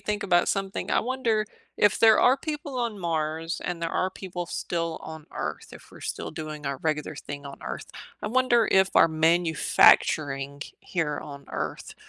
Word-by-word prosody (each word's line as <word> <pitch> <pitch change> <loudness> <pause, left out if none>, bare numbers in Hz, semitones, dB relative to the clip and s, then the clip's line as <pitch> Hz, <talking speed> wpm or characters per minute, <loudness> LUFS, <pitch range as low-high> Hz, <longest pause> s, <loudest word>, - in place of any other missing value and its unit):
think 210 0 -2
about 175 -3 +3
something, 195 0 -2
I - - +3
wonder 235 -4 0 0.3
if 210 0 +3
there 220 -1 +6
are 255 +2 +5
people 295 -3 -5
on 230 -4 -2
Mars 165 -1 -2
and 175 -1 -3
there 165 -1 -2
are 185 +2 0
people 180 -2 -6
still 165 -1 -3
on 160 -1 -9
Earth, - - -5
if - - -13
we're - - -14
still - - -4
doing 155 -2 -6
our 140 0 -2
regular 155 -1 -2
thing 145 -1 -8
on 140 - -9
Earth, - - -5 0.4
I - - -3
wonder 240 0 +3
if 190 0 +4
our 165 - +7
manufacturing 155 -3 +3 0.2
here 155 -5 -2
on 140 -2 -10
Earth - - -5
170 Hz, 175 wpm, -26 LUFS, 155-210 Hz, 0.4 s, our